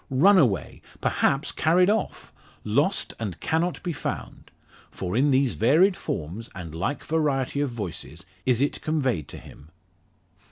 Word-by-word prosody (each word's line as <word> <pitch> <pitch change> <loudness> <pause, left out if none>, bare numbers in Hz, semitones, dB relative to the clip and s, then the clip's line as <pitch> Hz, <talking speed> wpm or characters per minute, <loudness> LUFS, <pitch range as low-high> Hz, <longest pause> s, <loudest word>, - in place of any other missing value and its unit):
run 185 +10 +5
away! 105 - 0 0.2
perhaps 140 +1 +1
carried 175 +3 +3
off! 215 +2 -1 0.3
lost, 145 - +1
and 100 -8 -4
cannot 165 +3 -1
be 175 - -2
found! - - -6 0.4
For 90 +1 -4
in 140 +4 +3
these 135 -2 +3
varied 165 - +4
forms, 90 - -5
and 85 -5 -7
like 95 - -3
variety 145 -3 0
of 145 - 0
voices, 90 - -6 0.2
is 125 +2 +2
it 145 - -2
conveyed 130 - -1
to - - -9
him. 75 - -14
135 Hz, 145 wpm, -25 LUFS, 100-160 Hz, 0.4 s, run